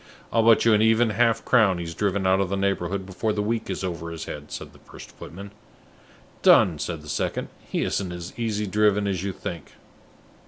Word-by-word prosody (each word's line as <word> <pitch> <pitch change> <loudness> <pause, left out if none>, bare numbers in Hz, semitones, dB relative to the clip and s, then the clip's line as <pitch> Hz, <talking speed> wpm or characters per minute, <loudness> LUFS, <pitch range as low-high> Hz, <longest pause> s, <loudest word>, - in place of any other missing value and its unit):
"I'll 115 - +4
bet 115 - +5
you 115 - +5
an 105 - +4
even 110 +1 +3
half 115 +2 +1
crown 110 -7 +4
he's 85 -1 -5
driven 100 +1 -1
out 95 +1 +3
of 100 -2 0
the 100 - -1
neighborhood 95 -1 -1
before 95 +4 -3
another 105 -1 0
week 115 0 -2
is 95 - -3
over 85 -3 -4
his 85 -1 -6
head," 75 0 -8
said - - -7
the - - -18
first - - -13
footman. 100 +4 -10 0.9
"Done!" 80 -5 +5
said 80 -1 -4
the - - -13
second. 75 - -2 0.2
"He - - -1
isn't 95 -3 -2
as 85 0 -7
easy 110 -3 -2
driven 105 0 +2
as 95 -3 -2
you 100 - -2
think." 85 -4 -7
100 Hz, 205 wpm, -24 LUFS, 90-105 Hz, 0.9 s, bet